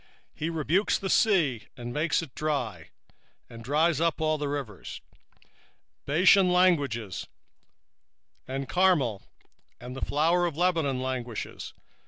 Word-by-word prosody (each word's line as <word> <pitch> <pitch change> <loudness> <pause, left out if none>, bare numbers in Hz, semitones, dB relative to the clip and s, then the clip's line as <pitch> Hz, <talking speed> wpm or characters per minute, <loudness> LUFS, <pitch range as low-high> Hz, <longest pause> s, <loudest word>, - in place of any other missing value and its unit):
1:4 - - -30 0.3
He 160 - -3
rebuketh 165 +5 +1
the 195 - -2
sea, 150 - +2
and 120 -1 -6
maketh 155 +2 +1
it 140 -7 -11
dry, 125 - -3 0.6
and 115 0 -11
drieth 155 +4 +2
up 165 -1 +1
all 155 -1 0
the 145 - -2
rivers: 140 -9 -5 1.1
Bashan 180 +5 +5
languisheth, 140 - +1 1.2
and 135 +1 -4
Carmel, 155 - +2 0.6
and 125 +2 -8
the 135 - -7
flower 170 +4 +2
of 160 -3 -6
Lebanon 165 -7 +1
languisheth. 125 -4 -5
150 Hz, 125 wpm, -27 LUFS, 125-170 Hz, 1.2 s, Bashan